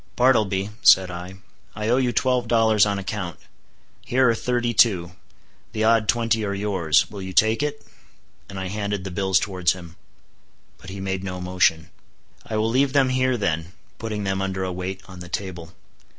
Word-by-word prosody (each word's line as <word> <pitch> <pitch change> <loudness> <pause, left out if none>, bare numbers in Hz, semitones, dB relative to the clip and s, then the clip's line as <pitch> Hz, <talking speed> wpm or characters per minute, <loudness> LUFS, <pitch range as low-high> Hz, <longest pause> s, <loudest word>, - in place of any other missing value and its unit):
"Bartleby," 105 -6 +2
said 95 -1 +6
I, 90 +2 -8 0.4
"I 105 0 -3
owe 120 +2 +3
you 125 -2 +1
twelve 125 0 +1
dollars 110 -3 +4
on 100 -1 -1
account; 95 -3 -5 0.7
here 130 +1 +2
are 115 - +4
thirty 120 0 -1
two; 95 -6 +3 0.6
the 110 -1 -1
odd 110 -1 +3
twenty 115 -1 +1
are 100 -1 -2
yours.—Will 100 -1 0
you 95 0 -6
take 110 +5 +3
it?" 145 0 -3 0.6
and 100 -1 -7
I 95 -1 -4
handed 100 -1 -3
the 95 - -6
bills 95 0 +2
towards 90 -3 0
him. 85 -2 -12 0.8
But 95 - -11
he 95 +1 -7
made 95 -1 -3
no 90 -1 -5
motion. 90 -3 +1 0.5
"I 110 - -4
will 110 +1 +1
leave 135 +2 +2
them 135 -2 +3
here 130 0 +1
then," 85 -4 -2 0.3
putting 110 -2 -4
them 95 0 -1
under 95 -1 -2
a 95 -1 -3
weight 95 +1 -5
on 95 -1 -11
the 90 0 -9
table. 85 -4 -5
100 Hz, 180 wpm, -23 LUFS, 95-115 Hz, 0.8 s, said